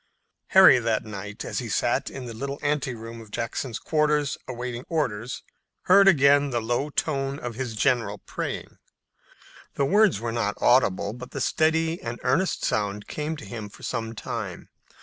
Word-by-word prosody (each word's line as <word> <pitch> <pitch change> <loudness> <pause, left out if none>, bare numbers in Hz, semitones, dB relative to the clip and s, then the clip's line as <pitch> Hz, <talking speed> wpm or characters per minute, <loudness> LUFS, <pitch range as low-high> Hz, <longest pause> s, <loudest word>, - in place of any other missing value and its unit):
Harry 190 -8 +8
that 115 -2 0
night, 100 -1 -7
as - - -3
he - - -5
sat - - 0
in 130 - -7
the 120 - -6
little 140 +5 -4
anteroom 125 -6 -2
of 110 - -13
Jackson's 115 +3 -3
quarters 150 -2 +1
awaiting 125 -1 -5
orders, 125 -8 -2 0.4
heard 195 +2 +6
again 145 -4 +5
the 120 -3 0
low 120 +6 -1
tone 140 -2 -1
of 120 -4 -5
his 120 -1 -4
general 115 -4 +1
praying. - - -6 1.0
The 140 - +1
words 205 - +4
were 115 0 -3
not 110 -3 -1
audible, 105 -5 +3
but 125 +1 -9
the 135 - -6
steady 160 +4 +1
and 115 +1 -5
earnest 155 +8 +1
sound 105 -1 -1
came 155 +1 -3
to 145 - -9
him 110 -3 -7
for - - -16
some 115 0 -3
time. 110 -6 -5
125 Hz, 165 wpm, -25 LUFS, 115-145 Hz, 1.0 s, Harry